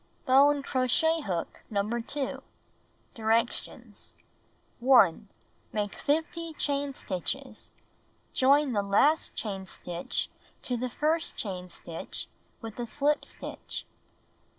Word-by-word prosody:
Bone 280 +2 +6
crochet 290 +6 +2
hook 180 - -3
No. 200 -1 0
2. 235 +5 -2 0.7
Directions: 230 +1 -1 0.6
1. 235 -6 +5 0.4
Make 205 -1 -1
50 325 +2 -1
chain 285 -2 -1
stitches. 185 -3 -4 0.6
Join 275 +1 +4
the 205 - +2
last 210 +11 +3
chain 195 -3 -3
stitch 175 -1 -3 0.4
to 250 - -2
'''inU;.^ 240 - 0
the 255 +1 -1
first 315 +6 0
chain 180 -3 -4
stitch 165 -1 -4 0.4
with 225 +1 -7
a 240 - -2
slip 290 +5 +1
stitch. - - -6
250 Hz, 105 wpm, -29 LUFS, 205-290 Hz, 0.7 s, Bone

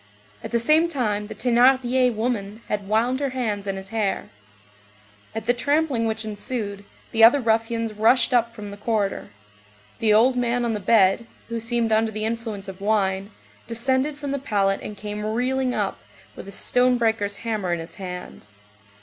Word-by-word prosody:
At - - -5
the 235 - +1
same 310 +8 +4
time 210 -8 -1
the - - -8
Thénardier 250 +1 +3
woman 220 -1 -3
had 205 -2 -2
wound 235 +5 +1
her 280 -1 -1
hands 205 -5 -2
in 195 - -1
his 190 0 -7
hair. 215 -3 -1 1.1
At 225 -1 -4
the 245 - +3
trampling 285 -2 +1
which 220 0 -3
ensued, 205 -1 -4 0.3
the 225 0 +3
other 240 +5 +8
ruffians 225 -1 0
rushed 230 +4 +3
up 235 -1 +2
from 205 -1 -7
the 200 - -9
corridor. 210 -2 -1 0.7
The 220 -1 +2
old 235 +5 +5
man 245 0 0
on 230 - 0
the 210 - -2
bed, 200 +2 +3 0.2
who 230 0 -3
seemed 230 0 0
under 220 0 +2
the 215 0 -3
influence 220 -3 -4
of 190 0 -9
wine, 195 -2 0 0.4
descended 260 +5 0
from 290 -2 -5
the 280 - -1
pallet 195 -6 +1
and 210 - -7
came 210 0 -5
reeling 250 +4 0
up, 205 -2 -2 0.4
with - - -10
a - - -8
stone 250 +5 +2
breaker's 220 -3 0
hammer 210 -6 -1
in 170 - 0
his 165 +1 -8
hand. 180 - -7
225 Hz, 175 wpm, -23 LUFS, 205-245 Hz, 1.1 s, other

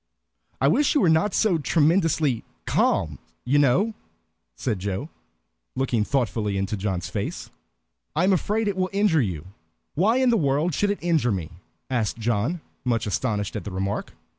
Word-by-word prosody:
"I 135 - +3
wish 275 - +3
you 290 - +4
were 175 - +4
not 160 +5 +2
so 190 -7 +2
tremendously 155 - +2 0.2
calm, 75 -5 +1 0.3
you 140 +4 +3
know," 160 - +3 0.6
said 105 - -2
Joe, 100 - -4 0.6
looking 125 -4 +1
thoughtfully 105 -5 -1
into 95 +2 -1
John's 95 -3 -2
face. - - -4 0.6
"I 160 - +2
am 190 +1 +4
afraid 210 +4 0
it 200 - 0
will 185 0 0
injure 195 -6 +3
you." 90 - -3 0.5
"Why 210 - +3
in 260 -2 +3
the 230 - +3
world 150 +1 +1
should 205 +7 +1
it 205 - 0
injure 160 -8 +2
me?" 90 -6 -3 0.4
asked 120 -5 -1
John, 120 +9 -1 0.2
much 115 -3 0
astonished 105 -1 -1
at - - -3
the - - -5
remark. 95 +1 -3
135 Hz, 165 wpm, -24 LUFS, -, 0.6 s, you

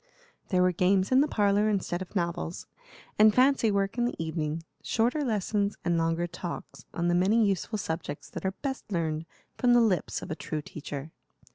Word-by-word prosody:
There 180 -2 +3
were 180 - +4
games 185 +3 +2
in 260 +1 +6
the 295 - +3
parlor 205 -3 +2
instead 185 -3 -1
of 185 - -8
novels, 170 -1 -2 0.5
and 215 0 +7
fancy 260 -3 +4
work 200 +3 0
in 240 - +3
the 240 - -2
evening; 160 -1 -3 0.2
shorter 245 +6 +1
lessons, 210 -3 0
and 175 - +2
longer 165 +1 +1
talks 175 0 -7
on 170 0 -1
the 175 - +3
many 200 +6 +4
useful 200 +2 -1
subjects 160 -6 -4
that - - -6
are 190 - +1
best 265 -6 -4
learned 160 -2 -1 0.3
from 245 -1 +4
the - - +7
lips 215 -6 +1
of - - -7
a - - -1
true 155 -2 -4
teacher. 145 0 -7
185 Hz, 185 wpm, -28 LUFS, 170-215 Hz, 0.5 s, and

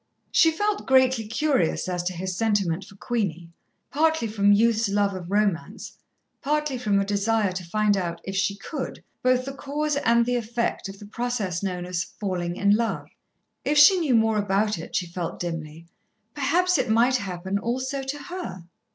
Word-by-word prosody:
She 325 - +5
felt 415 +6 -1
greatly 260 -4 +4
curious 240 - 0
as 180 -1 -1
to 185 - -1
his 185 +1 -4
sentiment 195 -4 0
for 195 - -15
Queenie, 190 -6 -3 0.4
partly 315 -4 +2
from 205 -1 +3
youth's 225 +1 +3
love 200 0 +1
of 180 -2 -7
romance, 200 -4 -1 0.5
partly 300 -2 -1
from 205 -5 +2
a 195 - 0
desire 205 0 +1
to 185 0 -5
find 210 +4 +1
out, 170 -3 -3
if 195 - -5
she 200 0 +1
could, 265 +7 -6 0.2
both 255 0 +2
the 275 - -5
cause 295 +2 -2
and 235 -3 +3
the 245 0 +1
effect 235 -2 -2
of 195 - -9
the 205 - -11
process 215 -5 -2
known 180 -3 -3
as 180 -1 -2
"falling 180 -4 -4
in 200 +2 +3
love." 230 0 -2 0.5
If 295 - +1
she 360 +6 +8
knew 290 -7 +2
more 220 -1 +3
about 205 -1 +1
it, 165 - -8
she 180 - +1
felt 170 0 -5
dimly, 165 -2 -5 0.5
perhaps 340 +4 +2
it 255 -2 0
might 240 +4 +4
happen 190 -2 -3
also 260 +5 -2
to 275 +2 -5
her. 350 - -6
215 Hz, 175 wpm, -25 LUFS, 190-260 Hz, 0.5 s, she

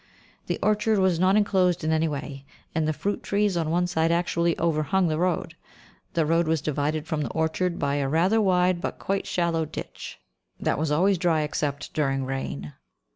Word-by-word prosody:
The - - -1
orchard 215 +1 +2
was 190 -3 +2
not 185 +2 +4
enclosed 185 -5 +2
in 155 - +1
any 160 +1 +2
way, 140 -2 -5 0.3
and 160 -1 0
the - - +2
fruit 200 +6 -2
trees 205 -1 0
on 165 -2 0
one 175 +2 +2
side 165 -2 +1
actually 170 0 +1
overhung 165 +3 +1
the 155 0 -1
road. 170 -2 -1 0.6
The 165 -2 +2
road 165 +1 +2
was 160 0 +2
divided 150 +1 -1
from 155 -1 -2
the - - -2
orchard 165 +2 -1
by 140 0 0
a 140 -1 0
rather 185 +9 +3
wide 180 -2 +2
but - - -3
quite 195 0 -2
shallow 170 -2 0
ditch, 155 - -8 0.4
that - - 0
was 160 0 0
always 185 +4 +3
dry 165 -3 +2
except 145 -1 -3
during 135 -3 0
rain. 75 - -4
165 Hz, 185 wpm, -25 LUFS, 150-180 Hz, 0.6 s, not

